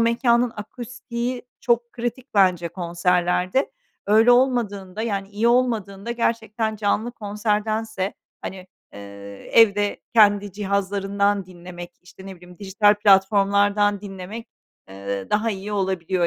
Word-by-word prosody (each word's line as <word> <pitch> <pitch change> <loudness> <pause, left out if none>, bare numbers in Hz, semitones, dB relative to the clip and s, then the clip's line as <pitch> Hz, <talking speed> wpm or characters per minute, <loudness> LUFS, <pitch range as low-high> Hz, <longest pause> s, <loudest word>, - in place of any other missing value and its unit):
mekânın 235 +1 +2
akustiği 240 +2 -5 0.2
çok 235 0 0
kritik 240 +1 -5
bence 180 -4 +3
konserlerde. 180 - 0 0.4
Öyle 220 +4 +5
olmadığında 220 -6 +1
yani 200 -4 -3
iyi 210 +3 0
olmadığında 230 -4 0
gerçekten 225 -2 -1
canlı 215 +3 -1
konserdense, 210 -1 -2 0.3
hani, 185 -1 -7 0.3
eee, - - -11 0.5
evde 205 -2 +4
kendi 205 -2 +4
cihazlarından 200 0 -1
dinlemek, 175 -1 -10
işte, 190 +1 -14
ne 190 -1 -9
bileyim, 180 0 -16
dijital 205 +1 +3
platformlardan 200 0 +3
dinlemek, 200 +3 -8 0.4
eee, 100 0 -6
daha 215 +2 +1
iyi 200 +1 -5
olabiliyor, 185 -2 0
205 Hz, 110 wpm, -22 LUFS, 190-225 Hz, 0.5 s, Öyle